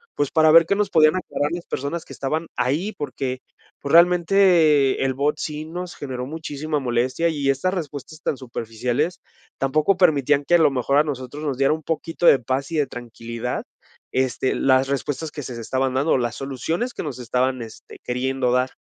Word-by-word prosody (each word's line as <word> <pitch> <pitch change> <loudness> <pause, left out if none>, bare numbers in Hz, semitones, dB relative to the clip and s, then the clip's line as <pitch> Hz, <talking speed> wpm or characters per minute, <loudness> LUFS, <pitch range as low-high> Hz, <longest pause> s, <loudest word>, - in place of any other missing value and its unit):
pues, 145 -2 -1
para 160 -1 +5
ver 165 +1 +8
qué 200 - +1
nos 205 -1 0
podían 155 -2 +5
aclarar 150 -3 -2
las 175 0 -5
personas 145 +5 -4
que - - -11
estaban 155 +4 -2
ahí, 155 - -1
porque, 130 -2 -4 0.4
pues 140 - -4
realmente 170 -5 +5
el 130 - +1
bot 145 +3 0
sí 150 0 -4
nos 175 +2 -6
generó 130 -3 -5
muchísima 155 0 -4
molestia 130 +6 0
y 145 -3 -1
estas 160 +8 +1
respuestas 155 -2 -6
tan 145 - -1
superficiales, 125 +7 -3 0.4
tampoco 155 +8 +2
permitían 145 -5 +3
que 175 - +4
a - - +8
lo 160 - +4
mejor 135 +1 +1
a 150 - +6
nosotros 145 +1 -5
nos 140 -4 -2
diera 135 0 +3
un 160 - -5
poquito 165 +2 -3
de 140 - +7
paz 130 +4 -2
y - - -3
de 145 -3 +1
tranquilidad, 120 0 -5 0.5
este, 130 0 0
las 130 0 +3
respuestas 140 +2 -3
que 145 - -7
se 120 -1 -7
estaban 130 +3 -1
dando, 140 +2 +2
las 120 -1 -2
soluciones 160 - -3
que - - -5
nos 140 -6 -6
estaban, 125 +1 0
este, 110 -1 -11
queriendo 125 0 -1
dar. 125 +1 +1
140 Hz, 190 wpm, -22 LUFS, 130-160 Hz, 0.5 s, ver